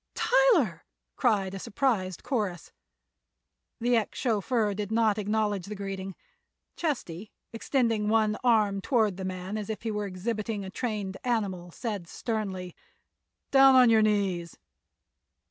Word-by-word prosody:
"Tyler!" 405 - +3 0.3
cried 200 -6 +1
a 195 - -5
surprised 195 -5 -1
chorus. 205 - -2 1.1
The 245 +1 +2
ex 220 - -2
chauffeur 225 -2 0
did 205 +1 -4
not 220 -2 +2
acknowledge 210 -2 -1
the 210 - -5
greeting. 195 -1 -5 0.6
Chesty, 220 - -3 0.2
extending 230 -3 0
one 215 -1 +2
arm 210 -5 +3
toward 215 -6 +1
the 190 - -5
man 185 +3 -4
as 210 - -6
if 220 - -5
he 225 - -2
were 210 -1 -2
exhibiting 205 +2 -3
a 190 - -7
trained 205 -5 -3
animal, 200 -8 -1
said 200 -1 -5
sternly: 190 -5 -4 0.8
"Down 270 -1 +7
on 250 -2 +7
your 220 -1 +5
knees!" 195 -5 0
210 Hz, 130 wpm, -28 LUFS, 195-230 Hz, 1.1 s, Down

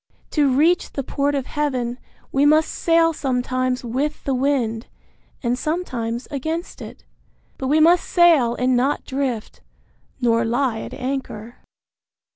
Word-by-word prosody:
To 290 -3 +2
reach 320 +7 +2
the 275 - -3
port 285 +2 -1
of 270 -2 -2
Heaven 255 -5 -2 0.3
we 275 - +2
must 310 +2 +4
sail 330 -1 +2
sometimes 255 -2 -1
with 275 +6 -2
the 275 - -1
wind, 250 -4 0 0.6
and 245 +1 0
sometimes 250 -8 -3
against 315 +5 -4
it; - - -10 0.5
but 265 - -2
we 300 +3 +3
must 335 +3 +4
sail 320 -10 +4
and 250 0 +1
not 265 +4 0
drift, 260 -5 -3 0.6
nor 230 -2 +2
lie 235 0 0
at - - -7
anchor. 250 -4 -5
265 Hz, 135 wpm, -21 LUFS, 245-300 Hz, 0.6 s, must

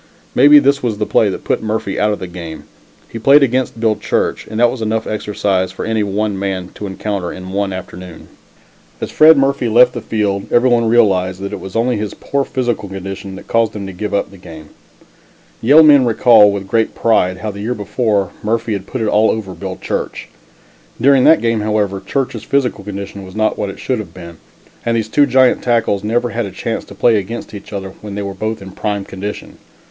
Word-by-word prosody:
Maybe 145 +3 +7
this 140 0 +3
was 115 -4 -2
the 105 - -1
play 105 - +2
that 95 - -5
put - - -1
Murphy 110 -2 -2
out 105 0 +2
of 105 - -2
the - - -6
game. 85 -3 -8 0.4
He 115 - -7
played 140 +5 +6
against 130 -2 0
Bill 110 -1 +2
Church, 105 - -2
and 110 +1 -5
that 120 0 +4
was 130 - -6
enough 110 0 -1
exercise 100 -3 -1
for - - -6
any 110 -1 0
one 100 0 -1
man 95 -2 -3
to 105 - -6
encounter 95 -2 -4
in 95 0 -8
one 100 0 -1
afternoon. 90 -2 -9 0.7
As - - -5
Fred 155 0 +7
Murphy 135 -3 +1
left 125 +2 +5
the - - -5
field 100 -3 -2
everyone 120 -1 +3
realized 95 -6 +2
that 100 - -5
it - - -4
was 95 - -9
only 120 +1 +1
his 105 -1 -4
poor 140 0 -2
physical 120 -7 -2
condition 95 0 -7
that 95 - -11
caused 115 -2 0
him 100 -2 -5
to 95 - -7
give 105 +4 -4
up 100 - -1
the 100 - -14
game. 80 -3 -12 0.9
Yale 145 +7 +7
men 145 -3 +7
recall, 115 -3 +5
with 100 -1 -5
great 115 +3 0
pride, 95 -5 +2
how 105 +3 -4
the 100 0 -8
year 120 +4 -2
before 105 -2 -1
Murphy 115 +1 -1
had 100 -1 -5
put 130 - -4
it 110 - 0
all 105 +1 +3
over 105 -4 -3
Bill 95 +2 -6
Church. - - -4 0.7
During 135 +1 +4
that 160 - +6
game, 115 -1 +1
however, 105 -2 0
Church's 125 +1 -3
physical 130 -7 -1
condition 100 0 -7
was 95 0 -11
not 110 0 +1
what 100 - -3
it - - -8
should 130 -3 -2
have 90 -6 -8
been, 85 -2 -10 0.5
and 115 0 0
these 110 -1 -2
two 145 +4 +3
giant 130 -1 +3
tackles 115 -5 0
never 120 +3 0
had 115 -2 -2
a - - -8
chance 115 +4 -4
to - - -13
play 115 -2 +3
against 105 +4 -5
each 100 - -10
other 95 -2 -5
when 105 -2 -7
they 100 - -3
were 100 -1 -5
both 110 +1 -4
in 95 - -10
prime 100 0 -3
condition. 100 +2 -7
105 Hz, 215 wpm, -16 LUFS, 95-115 Hz, 0.9 s, Maybe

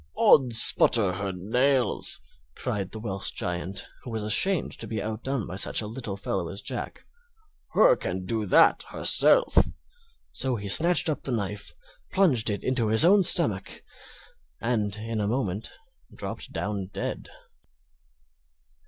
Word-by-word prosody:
"Ods 125 -5 +5
splutter 110 -4 +7
hur 100 +1 -5
nails!" 125 - -1 0.3
cried 100 -2 -5
the - - -10
Welsh 100 -3 -2
Giant, 90 +2 -5
who - - -11
was 110 -2 -5
ashamed 160 - 0
to - - -8
be 110 - -5
outdone 110 +3 -5
by 90 - -9
such - - 0
a 110 - -3
little 105 -2 -7
fellow 95 -3 -4
as 100 +3 -8
Jack, - - -7 0.7
"hur - - +4
can 95 0 -6
do 110 +1 -3
that - - +3
hurself;" - - +4 0.7
so 130 -2 -2
he 100 -2 -7
snatched 170 - +5
up 155 - -3
the 135 - -6
knife, 105 -3 -5 0.4
plunged 135 - +1
it 100 - -5
into 125 -3 -1
his 110 +8 +5
own 200 +3 +4
stomach, 140 - +2 0.8
and 110 -4 -3
in 110 0 -5
a 100 - -2
moment 110 -3 -4 0.5
dropped - - -7
down 100 -2 -5
dead. - - -6
110 Hz, 145 wpm, -25 LUFS, 100-130 Hz, 0.8 s, splutter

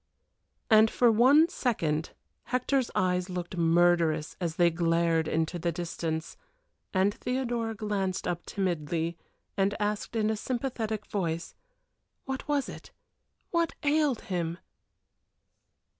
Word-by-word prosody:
And 220 0 +7
for 240 0 +4
one 265 +8 +6
second 165 - -1 0.3
Hector's 255 +1 0
eyes 180 0 +1
looked 180 0 -4
murderous 165 -2 +3
as 165 -2 -2
they 175 0 +4
glared 165 -1 +1
into 160 +2 -1
the 170 +1 0
distance 165 -1 -4 0.5
and 190 +1 +2
Theodora 240 -3 -2
glanced 200 -4 -2
up 175 -1 -2
timidly, 170 -3 -2 0.4
and 200 +1 +1
asked, 210 +2 -2
in 220 -1 +2
a - - 0
sympathetic 225 -3 -3
voice: 170 -4 -3 0.7
What 265 0 -4
was 290 -2 +1
it? - - -9 0.6
What 335 -1 +1
ailed 290 -4 +2
him? 170 -3 -3
190 Hz, 115 wpm, -29 LUFS, 170-235 Hz, 0.7 s, And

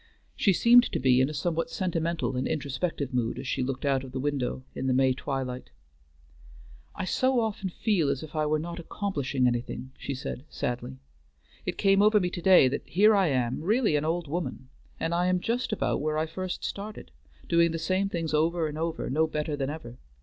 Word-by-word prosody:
She 200 - +3
seemed 240 +6 +6
to - - 0
be 130 0 +4
in 130 - +2
a - - -5
somewhat 165 +2 -1
sentimental 170 -5 -1
and 125 - -1
introspective 140 -1 -2
mood 120 -2 0
as 135 - -6
she - - -1
looked 130 +2 -3
out 135 -1 +1
of 130 -1 -10
the 130 - -2
window 135 -2 -2
in 130 - -3
the 130 - +2
May 130 0 +4
twilight. 130 -1 -4 1.3
"I 190 - -3
so 260 +6 +2
often 215 -4 -2
feel 180 -5 +1
as 140 0 -1
if 155 0 -10
I 155 -1 +1
were 155 +1 +2
not 170 +2 -5
accomplishing 145 -8 -2
anything," 125 +1 -2
she 140 - -4
said 130 0 -6
sadly. 120 - -4 0.7
"It - - -2
came 195 0 +4
over 210 0 +5
me 180 -2 -1
to 175 - -5
day 185 -7 +7
that 130 - -2
here 210 +5 +5
I 195 -3 +4
am, 130 -3 0
really 210 - +2
an 145 - +1
old 165 +1 -1
woman, 150 -4 -4 0.3
and 165 - -1
I 175 +1 +2
am 180 0 +2
just 240 +5 -1
about 215 - 0
where 155 +1 -1
I 155 - +1
first 185 +3 -5
started, 205 - -6 0.4
doing 170 0 +4
the 165 - -2
same 185 +4 0
things 165 -4 -3
over 160 +2 +2
and 150 0 -5
over 165 0 -2
and - - -3
no 160 +2 +3
better 150 -1 -2
than 135 -1 -2
ever. 125 -6 -8
155 Hz, 210 wpm, -28 LUFS, 135-180 Hz, 1.3 s, day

